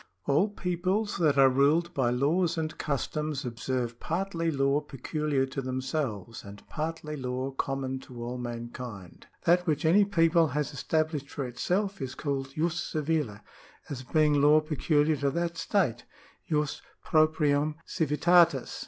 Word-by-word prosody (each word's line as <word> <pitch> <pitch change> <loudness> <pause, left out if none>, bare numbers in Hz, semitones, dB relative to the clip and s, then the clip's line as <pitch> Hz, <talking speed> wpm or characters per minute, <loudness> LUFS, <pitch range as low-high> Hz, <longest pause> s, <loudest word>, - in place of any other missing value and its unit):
— 90 - -47
" - - -43
All 155 +9 +3
peoples 190 +2 -1
that 150 -4 +2
are 135 -1 +7
ruled 145 +6 +3
by 130 -6 +1
laws 160 +8 +1
and 155 -1 -2
customs 150 0 -2
observe 120 0 -3
partly 165 -1 -2
law 140 -1 +1
peculiar 145 0 -2
to 135 +1 -5
themselves 130 - -3
and 100 0 -12
partly 155 -1 -4
law 130 0 -3
common 135 0 -3
to 125 -2 -9
all 125 +1 -4
mankind. 120 -5 -7 0.2
That 180 +2 +3
which 150 -1 0
any 190 +6 +6
people 165 -3 +3
has 150 0 -2
established 155 0 -1
for 140 - -4
itself 185 - -1
is 130 -1 -4
called 135 -2 -3
jus 165 +1 0
civile, 150 -11 -2 0.5
as 130 -3 -4
being 150 +1 +2
law 150 +2 +6
peculiar 155 0 +1
to 140 +1 +1
that 170 +3 -2
state 150 - 0 0.5
{jtos 150 -2 0 0.2
proprium 155 -2 +2
civitatis). 160 -2 +3
150 Hz, 145 wpm, -28 LUFS, 130-165 Hz, 0.5 s, are